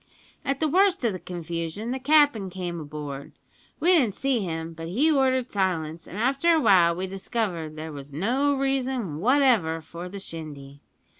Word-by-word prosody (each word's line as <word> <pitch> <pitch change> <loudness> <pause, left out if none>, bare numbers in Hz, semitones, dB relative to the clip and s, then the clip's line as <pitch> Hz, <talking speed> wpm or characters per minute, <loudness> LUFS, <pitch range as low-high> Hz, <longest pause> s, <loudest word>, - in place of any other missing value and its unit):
"At 275 -1 -1
the 315 - +2
worst 370 -1 +3
o' 230 - +3
the 185 - -5
confusion 170 +5 -5
the 260 - -2
cap'n 290 -8 +3
came 175 -2 -5
aboard. 145 -2 -7 0.5
We 345 - +2
didn't 245 - +3
see 270 -3 +1
him, 165 -4 -4
but 165 0 -7
he 265 - +2
ordered 260 -3 +2
silence, 170 -5 -2
an' - - -9
after 270 +9 +2
a 325 - +4
while 180 - +5
we 185 +2 -2
discovered 190 -4 -3
that - - -14
there 155 +1 -6
was 140 -1 -9
no 250 - +1
reason 265 - -1
whatever 230 - +3
for 170 +3 -9
the 200 - -8
shindy. 145 -6 -8
190 Hz, 175 wpm, -25 LUFS, 165-265 Hz, 0.5 s, while